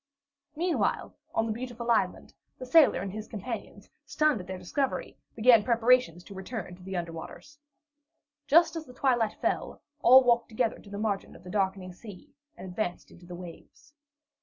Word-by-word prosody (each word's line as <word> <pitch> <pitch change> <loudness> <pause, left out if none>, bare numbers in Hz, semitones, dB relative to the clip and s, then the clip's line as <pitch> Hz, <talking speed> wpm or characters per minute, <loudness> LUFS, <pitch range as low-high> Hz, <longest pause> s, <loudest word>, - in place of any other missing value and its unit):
Meanwhile, 345 +2 -1 0.2
on 225 - +2
the 225 - -2
beautiful 240 0 -4
island, 230 - 0 0.2
the 255 - -7
sailor 300 - +5
and 195 0 -4
his 215 +2 -7
companions, 225 +2 -7 0.2
stunned 305 -9 +1
at 180 - -12
their 185 0 -5
discovery, 260 +10 -2 0.2
began 230 -1 +6
preparations 235 -6 +3
to 200 - -12
return 190 -1 -6
to 180 - -18
the 190 0 -5
under 170 -1 -3
waters. 295 - -10 0.9
Just 335 +4 +5
as 320 -1 -6
the 250 - -13
twilight 240 -5 +1
fell, - - -2 0.2
all 260 +2 +8
walked 235 -1 +2
together 225 +1 -1
to 205 - -15
the 200 - -6
margin 205 -2 -2
of - - -15
the 180 - -9
darkening 190 -2 -1
sea, 195 0 -13 0.2
and - - -8
advanced 180 0 -4
into 175 0 -16
the 175 - -7
waves. 180 - -12
220 Hz, 175 wpm, -28 LUFS, 185-250 Hz, 0.9 s, all